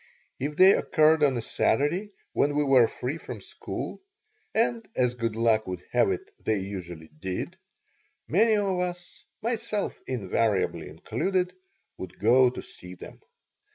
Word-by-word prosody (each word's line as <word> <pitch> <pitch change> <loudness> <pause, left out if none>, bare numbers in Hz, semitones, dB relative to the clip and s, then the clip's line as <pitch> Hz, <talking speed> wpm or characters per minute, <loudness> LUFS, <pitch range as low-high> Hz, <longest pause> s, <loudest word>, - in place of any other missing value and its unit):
If 145 +3 -3
they 185 +4 +8
occurred 155 -1 +3
on 135 -4 +3
a 115 - -3
Saturday, 170 - +1 0.2
when 145 +1 +2
we 150 - +3
were 130 -4 +5
free 135 +8 -4
from - - -7
school - - -6 0.5
and, 230 +1 +1
as 125 -1 +2
good 115 -2 -2
luck 110 -1 +2
would 90 -1 -5
have - - +3
it, 390 +2 -3
they 110 - +1
usually 90 -5 -6
did 90 +5 -5 0.7
many 220 +6 +4
of 195 -3 0
us, 180 0 -5 0.2
myself 220 -3 -2
invariably 105 -3 0
included, 185 -1 -1 0.5
would 90 -1 -8
go 125 +4 +5
to 125 - -7
see 90 0 -11
them. - - -12
135 Hz, 145 wpm, -27 LUFS, 110-185 Hz, 0.7 s, they